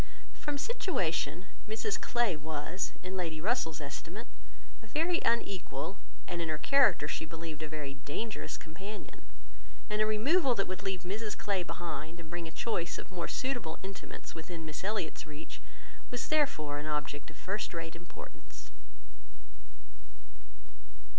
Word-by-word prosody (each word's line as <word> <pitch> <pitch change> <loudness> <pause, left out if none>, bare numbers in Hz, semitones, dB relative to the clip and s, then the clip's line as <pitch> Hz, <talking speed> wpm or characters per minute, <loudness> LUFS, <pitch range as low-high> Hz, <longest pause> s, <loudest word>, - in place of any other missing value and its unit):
From 295 -1 -1
situation, 185 - +1 0.2
Mrs 430 - +1
Clay 235 -7 +3
was, 155 +4 -1
in 185 +1 -3
Lady 165 -4 0
Russell's 185 - +2
estimate, 165 +9 -4 0.6
a 220 - -12
very 330 +8 +3
unequal, 195 -6 +1 0.3
and 170 - -1
in 165 - 0
her 155 - +2
character 200 - +6
she 150 - -1
believed 160 -1 -5
a 155 - -2
very 150 -3 -2
dangerous 145 +11 -2
companion; 195 +7 -7 0.7
and 210 0 +3
a 215 - +6
removal 255 +6 +5
that 195 - +2
would 185 +1 -2
leave 190 -3 0
Mrs 205 +4 -2
Clay 200 -3 +2
behind, 165 -1 -3
and 165 -1 -8
bring 170 -1 -2
a - - -6
choice 170 -3 0
of - - -7
more 175 -2 -1
suitable 245 -12 0
intimates 195 0 -6
within 160 0 -5
Miss 155 +2 -4
Elliot's 195 -6 0
reach, 150 0 -7 0.5
was 245 -1 -1
therefore 155 - +3
an 150 - -3
object 150 -1 -1
of - - -12
first 200 +3 -1
rate 165 -1 -3
importance. 175 +1 -10
175 Hz, 145 wpm, -34 LUFS, 160-220 Hz, 0.7 s, character